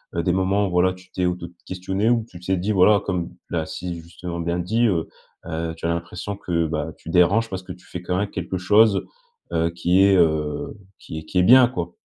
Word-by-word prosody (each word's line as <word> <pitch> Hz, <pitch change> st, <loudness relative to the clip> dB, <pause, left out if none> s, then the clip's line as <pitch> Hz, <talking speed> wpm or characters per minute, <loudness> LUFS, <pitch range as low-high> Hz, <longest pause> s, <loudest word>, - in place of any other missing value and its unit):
heu, 85 Hz, -, 0 dB
des 90 Hz, -, +1 dB
moments 95 Hz, +2 st, +1 dB
où -, -, -5 dB
voilà, 90 Hz, +1 st, +3 dB
tu 90 Hz, 0 st, -17 dB
t'es 90 Hz, -, -1 dB
auto-questionné 90 Hz, +3 st, -2 dB
ou 115 Hz, -2 st, +2 dB
tu 90 Hz, -, -11 dB
t'es 95 Hz, +1 st, -1 dB
dit 95 Hz, +5 st, -1 dB
voilà, 100 Hz, +1 st, +5 dB
comme 90 Hz, -3 st, -3 dB
là, 80 Hz, -2 st, -1 dB
si, 85 Hz, 0 st, -5 dB
justement 85 Hz, +1 st, -7 dB
bien 85 Hz, +1 st, -1 dB
dit, 110 Hz, +7 st, +1 dB
heu, 85 Hz, -6 st, 0 dB, 0.4 s
heu, 80 Hz, 0 st, -3 dB
tu 80 Hz, -, -7 dB
as -, -, +1 dB
l'impression 85 Hz, +4 st, -4 dB
que, 85 Hz, -4 st, -1 dB
bah, 80 Hz, 0 st, -3 dB
tu -, -, -11 dB
déranges 95 Hz, +7 st, +3 dB
parce 95 Hz, -2 st, -5 dB
que 90 Hz, -, -9 dB
tu 90 Hz, 0 st, -18 dB
fais 90 Hz, -, -6 dB
quand 90 Hz, 0 st, -1 dB
même 100 Hz, +1 st, -1 dB
quelque 95 Hz, 0 st, -4 dB
chose, 105 Hz, +3 st, +4 dB, 0.5 s
heu, 85 Hz, +1 st, +1 dB
qui 90 Hz, +2 st, +3 dB
est, 100 Hz, 0 st, +5 dB
heu, 80 Hz, -2 st, +1 dB, 0.2 s
qui 80 Hz, -, -7 dB
est -, -, -10 dB
qui 85 Hz, -, -4 dB
est -, -, +5 dB
bien 125 Hz, +5 st, +8 dB
quoi. 85 Hz, -9 st, -5 dB
90 Hz, 230 wpm, -23 LUFS, 85-95 Hz, 0.5 s, bien